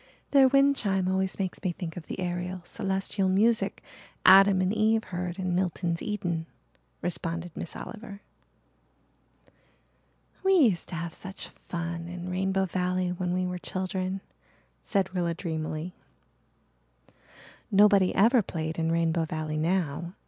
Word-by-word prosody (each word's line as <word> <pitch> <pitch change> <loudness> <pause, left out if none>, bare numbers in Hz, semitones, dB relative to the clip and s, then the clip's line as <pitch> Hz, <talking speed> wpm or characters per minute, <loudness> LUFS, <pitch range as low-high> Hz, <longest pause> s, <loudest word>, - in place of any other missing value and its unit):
"Their 275 -2 +7
wind 275 +1 +4
chime 195 -6 0
always 190 0 0
makes 190 -2 -3
me 185 - +1
think 165 -2 -6
of 175 - -8
the - - -5
aerial, 180 0 -3
celestial 195 +1 -1
music 220 +5 +2 0.4
Adam 195 0 +8
and 185 +2 +1
Eve 220 +1 +2
heard 180 0 -4
in 185 -2 -1
Milton's 175 -2 -1
Eden," 175 -6 -2 0.6
responded 170 -1 -4
Miss 170 - -6
Oliver. 210 -3 -8 2.2
"We 385 0 +4
used 235 - +4
to 180 - -5
have 170 -1 -4
such 190 +1 -8 0.2
fun 170 -1 -4
in 175 +1 -6
Rainbow 190 +1 +1
Valley 180 0 -1
when 180 0 -2
we 185 +1 0
were 180 0 -3
children," 185 +1 -3 0.6
said 190 -2 0
Rilla 170 -2 0
dreamily. 160 0 -4 1.8
Nobody 200 -2 +5
ever 230 +5 +5
played 160 -3 -4
in 165 0 +1
Rainbow 165 0 +1
Valley 155 -1 -3
now. 170 0 -1
185 Hz, 135 wpm, -28 LUFS, 170-195 Hz, 2.2 s, Adam